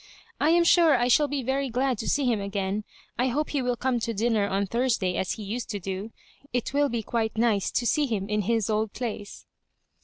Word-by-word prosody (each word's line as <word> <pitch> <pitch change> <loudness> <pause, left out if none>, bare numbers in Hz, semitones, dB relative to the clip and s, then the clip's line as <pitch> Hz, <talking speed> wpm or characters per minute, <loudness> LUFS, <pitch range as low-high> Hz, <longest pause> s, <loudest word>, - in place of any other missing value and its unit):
"I 300 - +3
am 340 +1 +5
sure 335 -4 +5
I 240 0 +1
shall 290 +4 +4
be 285 -1 -2
very 270 +2 -1
glad 250 -1 0
to - - -2
see 285 -1 +1
him 230 -5 +1
again. 200 +1 -2 0.3
I 250 - +3
hope 290 +5 -1
he 285 - 0
will 245 -1 0
come 250 0 0
to 230 0 -3
dinner 220 -1 +1
on 200 0 0
Thursday 230 -4 0
as 185 - -1
he 215 - -7
used 225 +5 -4
to 205 -2 -3
do. 195 +3 -5 0.4
It 245 +1 -2
will 285 0 +2
be 230 -1 -2
quite 225 0 -2
nice 220 -4 +2
to 240 - -1
see 295 +4 +2
him 205 -5 -2
in 210 0 0
his 225 +1 0
old 215 -1 -1
place." 210 -3 -6
235 Hz, 225 wpm, -26 LUFS, 205-260 Hz, 0.4 s, am